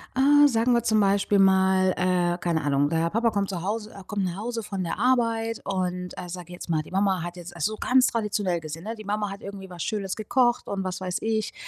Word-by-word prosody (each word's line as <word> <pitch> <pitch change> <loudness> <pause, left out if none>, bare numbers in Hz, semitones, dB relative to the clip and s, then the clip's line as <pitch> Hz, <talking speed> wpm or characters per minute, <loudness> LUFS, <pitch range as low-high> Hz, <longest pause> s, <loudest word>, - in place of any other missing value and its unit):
Ah, 290 +2 +6
sagen 240 -1 +2
wir 235 - +2
zum 215 -2 +2
Beispiel 200 0 +2
mal, 190 -1 +4
äh, 180 -1 +1
keine 170 -3 -1
Ahnung. 145 0 +1
Der 165 0 +1
Papa 230 +5 +1
kommt 200 -2 -1
zu 175 -3 -4
Hause 215 +2 -3
er 195 -1 -11
kommt 200 -1 -2
nach 180 -1 -3
Hause 230 +2 -4
von 195 -3 -4
der 165 - -3
Arbeit 230 -2 +1
und, 180 -2 -2
äh, 180 - -6
sage 175 0 -8
jetzt 175 - -9
mal, 155 -2 +1
die - - -15
Mama 190 -2 +1
hat 175 +1 -6
jetzt 175 0 -9
so 215 +5 0
ganz 255 +2 +3
traditionell 205 -6 -1
gesehen. 160 +3 -8
Die 215 - -9
Mama 210 0 -2
hat 195 - -8
irgendwie 195 -1 -8
was 175 -2 -6
Schönes 195 -3 -2
gekocht. 240 +3 +1
Und 195 -1 -2
was 185 0 -4
weiß 180 -1 -2
ich. 220 -1 -1
195 Hz, 230 wpm, -25 LUFS, 180-220 Hz, -, Ah